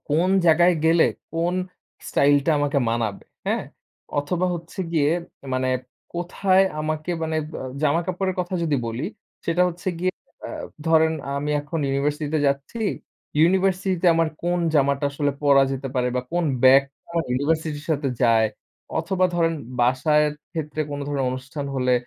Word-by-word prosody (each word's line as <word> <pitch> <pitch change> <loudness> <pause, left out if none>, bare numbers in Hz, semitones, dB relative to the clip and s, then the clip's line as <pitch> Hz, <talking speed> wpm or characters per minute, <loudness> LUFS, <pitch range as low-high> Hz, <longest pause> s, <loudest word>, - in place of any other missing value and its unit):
কোন 165 +5 +2 0.2
জায়গায় 175 +2 +5
গেলে 165 +1 +5 0.3
কোন 170 +2 0 0.5
স্টাইল 145 +1 +4
টা - - +4
আমাকে 145 -1 +1
মানাবে। 115 -3 -2 0.2
হ্যা? - - +1 0.6
অথবা 175 +5 0
হচ্ছে 170 +1 -9
গিয়ে 150 -3 +3 0.4
মানে 130 0 0 0.5
কোথায় 185 +2 +2 0.2
আমাকে 155 +2 -2
মানে 160 0 -1
ব - - -16 0.3
জামা 155 +2 +3
কাপড়ের 185 +1 -1
কথা 180 +1 -3
যদি 155 -4 +1
বলি, 115 +5 -3 0.4
সেটা 170 +2 +3
হচ্ছে 175 +1 -5
গিয়ে 185 +1 0 0.3
আ - - -6 0.4
ধরেন 160 0 +4 0.3
আমি 145 +1 -2
এখন 150 +3 -4
ইউনিভার্সিটি 145 +2 -1
তে - - +3
যাচ্ছি। 140 +11 -3 0.6
ইউনিভার্সিটি 185 +2 +3
তে - - +3
আমার 165 0 +2
কোন 175 +1 +1 0.2
জামাটা 140 0 +2
আসলে 145 0 0
পরা 140 -1 +6
যেতে 135 0 -4
পারে 125 -1 +1
বা - - +2
কোন 175 0 +1 0.2
ব্যাগটা 135 +2 +5
আমার 165 -1 0
ইউনিভার্সিটির 150 +3 -1
সাথে 145 -2 -1
যায় 115 -2 +4 0.5
অথবা 185 +3 +1
ধরেন 165 -1 +2 0.3
বাসার 135 +5 +3 0.3
ক্ষেত্রে 155 -2 -4
কোনো 145 0 -4
ধরনের 140 -2 -1
অনুষ্ঠান 130 +3 -5
হলে 125 -1 +1
155 Hz, 150 wpm, -23 LUFS, 140-170 Hz, 0.6 s, পরা